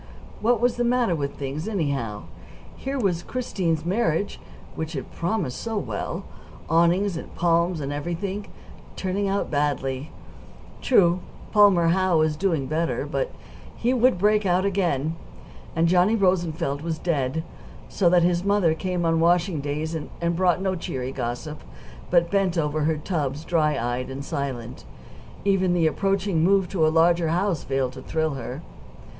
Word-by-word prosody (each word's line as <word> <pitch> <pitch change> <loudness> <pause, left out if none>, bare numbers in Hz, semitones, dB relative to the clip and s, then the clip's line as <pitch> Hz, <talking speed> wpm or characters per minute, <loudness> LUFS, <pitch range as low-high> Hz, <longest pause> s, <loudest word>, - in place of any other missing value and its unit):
What 235 +1 +2
was 245 +1 +1
the 240 - +1
matter 240 -5 +2
with 140 -3 -3
things, 140 +4 -4
anyhow? 140 - -2 0.5
Here 270 +1 -4
was 185 -7 +1
Christine's 175 -10 -2
marriage, 185 -1 0 0.3
which 160 +1 -5
had 135 - -5
promised 170 - -2
so 225 -1 -3
well, 110 - -3 0.4
awnings 170 +3 +3
and - - -9
palms 170 0 +2
and 140 -1 -3
everything, 175 +7 -4 0.5
turning 195 +2 -1
out 195 -2 -1
badly. 145 -1 -1 0.7
True, 180 -8 +4 0.3
Palmer 200 -5 +5
Howe 185 -1 +3
was 155 -1 +2
doing 160 -4 0
better, 160 +4 -1
but - - -2 0.5
he 245 +2 +1
would 255 -3 +3
break 210 +3 +3
out 185 0 +2
again. 165 -6 0 0.6
And 165 0 +3
Johnny 180 +5 +4
Rosenfeld 170 -7 0
was 165 0 -3
dead, 160 -2 -1 0.4
so 180 -4 +2
that 175 -1 +4
his 175 0 +2
mother 200 -5 +3
came 180 +1 -2
on 165 0 +2
washing 170 -1 +2
days, 150 +3 -3
and 170 +2 -3
brought 180 0 +2
no 190 -1 +1
cheery 130 -7 -4
gossip; 130 +6 -4 0.5
but 170 0 +3
bent 195 -3 +1
over 150 -1 0
her 160 0 +1
tubs 150 -2 -3
dry 155 -3 +2
eyed 120 +2 -2
and 135 +1 -6
silent 130 -4 -4 0.6
even 190 -2 +2
the 170 -2 +2
approaching 195 0 +1
move 195 +1 +3
to 160 -5 +2
a - - +4
larger 165 +1 +3
house 175 0 0
failed 135 -1 -1
to 130 - -9
thrill 160 +2 -1
her. 130 +3 -6
170 Hz, 155 wpm, -24 LUFS, 150-190 Hz, 0.7 s, Palmer